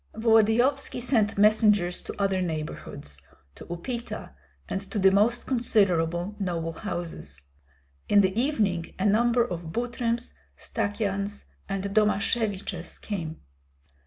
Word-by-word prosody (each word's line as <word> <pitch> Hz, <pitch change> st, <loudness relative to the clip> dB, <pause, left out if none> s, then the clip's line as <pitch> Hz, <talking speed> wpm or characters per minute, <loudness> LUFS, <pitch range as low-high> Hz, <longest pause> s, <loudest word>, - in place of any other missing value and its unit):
Volodyovski 225 Hz, +5 st, +3 dB
sent 225 Hz, -4 st, +2 dB
messengers 210 Hz, -4 st, +4 dB
to -, -, -8 dB
other 195 Hz, -2 st, +1 dB
neighborhoods, 155 Hz, -, -5 dB, 0.3 s
to -, -, -12 dB
Upita, 235 Hz, -, -5 dB, 0.4 s
and 195 Hz, -, -2 dB
to -, -, -4 dB
the 190 Hz, -1 st, +5 dB
most 215 Hz, +5 st, +2 dB
considerable 190 Hz, -7 st, +1 dB
noble 170 Hz, -4 st, -2 dB
houses. 165 Hz, -, -6 dB, 0.7 s
In 205 Hz, 0 st, +6 dB
the 190 Hz, 0 st, +1 dB
evening 210 Hz, -, 0 dB
a 190 Hz, -, -1 dB
number 235 Hz, +3 st, +3 dB
of 170 Hz, -5 st, -5 dB
Butryms, 240 Hz, +2 st, -2 dB, 0.2 s
Stakyans, 205 Hz, -1 st, -2 dB, 0.2 s
and 195 Hz, -1 st, -2 dB
Domasheviches 205 Hz, -2 st, 0 dB
came. 165 Hz, -6 st, -5 dB
205 Hz, 110 wpm, -27 LUFS, 175-225 Hz, 0.7 s, In